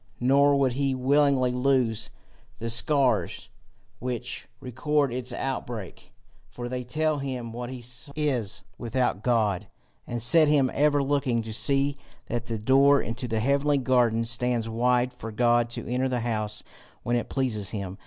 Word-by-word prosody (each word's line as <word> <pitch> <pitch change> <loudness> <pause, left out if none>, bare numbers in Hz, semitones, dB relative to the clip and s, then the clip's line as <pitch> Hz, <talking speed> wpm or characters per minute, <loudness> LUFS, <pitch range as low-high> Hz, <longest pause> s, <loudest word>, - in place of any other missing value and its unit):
Nor 140 +3 +4
would 135 -3 +2
he 135 0 0
willingly 135 -1 +3
lose 125 -4 +1 0.5
the 115 0 -4
scars 130 +3 +1 0.5
which 125 -2 -4
record 140 +2 0
its 125 0 -4
outbreak, 120 -7 -5 0.4
for 120 0 -6
they 125 0 -4
tell 155 +4 0
him 130 -4 -4
what 120 +1 -6
he 130 -2 -7 0.3
is 130 -9 -1 0.2
without 120 -3 -1
God, 110 -6 +1 0.4
and 120 - -3
set 155 +7 +5
him 140 -3 +3
ever 145 0 +3
looking 135 -4 0
to 110 0 -6
see 140 +4 +1 0.3
that 120 -1 -4
the 115 - -2
door 135 +5 +5
into 120 +3 -4
the 110 -1 -1
heavenly 140 +4 +2
garden 120 -3 +2
stands 120 0 -1
wide 125 +2 +1
for 115 - -8
God 120 +1 +2
to 120 - -5
enter 125 +2 0
the 125 -2 -1
house 110 -2 -3 0.4
when 120 - 0
it 120 - -2
pleases 110 -8 -1
him. 95 -3 -5
125 Hz, 155 wpm, -26 LUFS, 115-135 Hz, 0.5 s, set